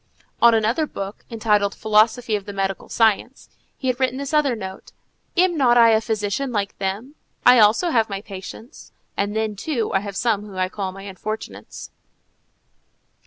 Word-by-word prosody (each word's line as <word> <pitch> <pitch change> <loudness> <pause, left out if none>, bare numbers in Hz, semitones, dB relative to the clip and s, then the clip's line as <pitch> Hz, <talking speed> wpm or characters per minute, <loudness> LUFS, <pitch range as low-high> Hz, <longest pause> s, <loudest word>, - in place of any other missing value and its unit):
On 235 -1 +7
another 230 +8 +1
book, 195 -4 -7
entitled 210 -3 +1
Philosophy 220 +1 +2
of 200 -2 -4
the 205 - -7
Medical 195 -1 -3
Science, 225 +3 +1 0.3
he 265 - -4
had 250 0 0
written 260 -1 0
this 280 +2 -5
other 290 -5 +3
note: 190 -3 -8 0.4
"Am 360 0 +4
not 245 -5 +4
I 230 -1 +7
a 220 0 +3
physician 220 +4 -2
like 205 -3 -2
them? 200 +8 -3 0.3
I 250 - +8
also 225 +11 +4
have 225 -5 +2
my 195 -1 -3
patients, 210 +6 -10 0.2
and 205 +1 -1
then, 220 -1 -1
too, 235 0 -2
I - - +3
have 200 0 -7
some 220 -1 +1
whom 205 -2 -11
I 185 0 0
call 195 -1 -4
my 195 +1 -11
unfortunates." 205 +3 -7
220 Hz, 170 wpm, -22 LUFS, 200-245 Hz, 0.4 s, I